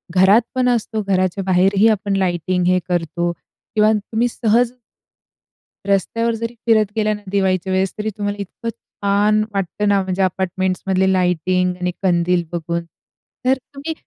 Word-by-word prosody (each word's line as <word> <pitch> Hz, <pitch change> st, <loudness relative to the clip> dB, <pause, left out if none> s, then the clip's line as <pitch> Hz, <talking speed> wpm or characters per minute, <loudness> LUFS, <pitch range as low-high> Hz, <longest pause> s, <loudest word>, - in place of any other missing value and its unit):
घरात 190 Hz, +5 st, +6 dB
पण 255 Hz, -1 st, +2 dB
असतो, 225 Hz, -2 st, -1 dB
घराच्या 185 Hz, 0 st, +1 dB
बाहेरही 195 Hz, +3 st, +3 dB
आपण 200 Hz, -2 st, 0 dB
लायटिंग 180 Hz, -1 st, 0 dB
हे 185 Hz, 0 st, +3 dB
करतो 175 Hz, 0 st, -1 dB, 0.4 s
किंवा 215 Hz, 0 st, +5 dB
तुम्ही 220 Hz, +3 st, -1 dB
सहज 235 Hz, +1 st, +1 dB, 1.1 s
रस्त्यावर 230 Hz, +4 st, +1 dB
जरी 230 Hz, +1 st, -4 dB
फिरत 215 Hz, -3 st, +3 dB
गेला 215 Hz, -1 st, +1 dB
ना 210 Hz, -, -7 dB
दिवाळीच्या 190 Hz, -2 st, +1 dB
वेळेस, 190 Hz, 0 st, +1 dB
तरी 215 Hz, 0 st, -2 dB
तुम्हाला 205 Hz, 0 st, -2 dB
इतकं 200 Hz, +4 st, -6 dB
छान 205 Hz, 0 st, 0 dB
वाटतं 200 Hz, +1 st, -2 dB
ना 200 Hz, -1 st, +3 dB
म्हणजे 185 Hz, 0 st, -2 dB
अपार्टमेंट्समधले 190 Hz, +1 st, 0 dB
लाइटिंग 180 Hz, 0 st, +1 dB
आणि 180 Hz, 0 st, -1 dB
कंदील 175 Hz, -1 st, +2 dB
बघून. 170 Hz, 0 st, -3 dB, 0.6 s
तर 260 Hz, -, +5 dB
तुम्ही 280 Hz, +4 st, -7 dB
195 Hz, 140 wpm, -19 LUFS, 185-215 Hz, 1.1 s, घरात